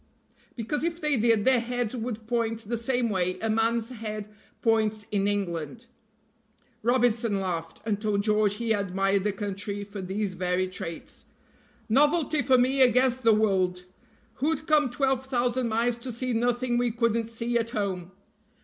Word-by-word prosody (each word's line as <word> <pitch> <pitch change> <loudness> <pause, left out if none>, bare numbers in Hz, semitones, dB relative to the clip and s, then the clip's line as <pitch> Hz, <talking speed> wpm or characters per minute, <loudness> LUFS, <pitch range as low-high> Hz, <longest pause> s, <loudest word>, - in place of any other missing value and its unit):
"Because 255 +6 -2
if 335 0 -1
they 300 -3 +1
did 225 -2 +2
their 260 -2 +5
heads 245 0 -2
would 225 -2 -4
point 230 -1 -1
the 235 - -1
same 240 +1 0
way 185 -1 0
a 225 0 -1
man's 225 +1 +1
head 215 -4 -6 0.4
points 220 -2 +1
in 200 -1 +1
England." 195 - -3 1.0
Robinson 235 -3 +2
laughed, 170 -4 -4
and 210 -2 -1
told 205 -2 0
George 210 -1 +2
he 230 0 -2
admired 195 -1 +1
the 210 - +1
country 200 0 -4
for 200 0 -7
these 190 +1 -2
very 180 0 0
traits. 185 -3 -7 0.6
"Novelty 295 +5 +3
for 255 +1 +4
me 260 +2 +2
against 255 0 +4
the 230 -2 +5
world. 190 -4 +2 0.5
Who'd 305 +2 -1
come 300 -3 +3
twelve 265 +1 0
thousand 250 -1 0
miles 230 +1 +1
to 245 +2 -6
see 250 +2 -1
nothing 240 +1 +1
we 245 0 +2
couldn't 230 -1 0
see 230 +1 -1
at 230 0 -2
home? 190 -5 -3
225 Hz, 160 wpm, -27 LUFS, 205-245 Hz, 1.0 s, their